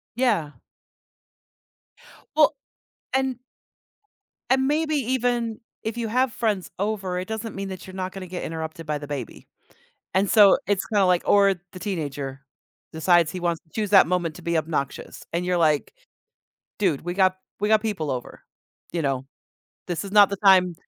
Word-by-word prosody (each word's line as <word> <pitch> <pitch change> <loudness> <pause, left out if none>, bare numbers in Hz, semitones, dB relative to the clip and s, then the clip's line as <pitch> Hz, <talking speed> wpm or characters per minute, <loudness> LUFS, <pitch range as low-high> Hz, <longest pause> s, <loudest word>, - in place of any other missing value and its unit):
Yeah. 225 - +1 1.8
Well 305 -1 +5 0.6
and 265 -2 0 1.1
And 265 0 +3
maybe 310 +1 +1
even 245 -3 0 0.2
if 220 +1 -3
you 235 -1 -2
have 255 +2 +1
friends 210 -6 -1
over, 195 -3 -1
it 185 - -5
doesn't 220 0 -5
mean 195 0 -4
that 185 -2 -7
you're 185 - -11
not 185 0 -3
gonna 190 -1 -8
get 180 0 -5
interrupted 160 0 -5
by 150 -1 -1
the 145 0 -8
baby. 140 -6 -6 0.7
And 195 +1 +2
so, 205 -3 +7
it's 200 -2 +1
kinda, 205 -4 +2
like 180 -1 +3
or 200 -1 +5 0.2
the 185 - -8
teenager 145 -8 -4 0.5
decides 165 0 +3
he 180 - -6
wants 170 -2 -1
to 160 - -33
choose 210 -2 -1
that 195 - +7
moment 175 -3 -1
to 175 - -11
be 170 0 0
obnoxious, 155 -3 -3
and 170 +2 -1
you're, 180 0 +1
like, 155 - +2 0.9
"Dude, 180 -9 +1
we 175 +1 -4
got 185 -1 +3 0.2
we 210 - +1
got 215 -1 +4
people 200 -10 -2
over, 125 -2 -5 0.5
you 170 - -1
know, 135 -2 -1 0.6
this 175 +1 -3
is 195 - -7
not 205 -2 +7
the 200 - -2
time 185 -2 +6
185 Hz, 165 wpm, -24 LUFS, 165-215 Hz, 1.8 s, so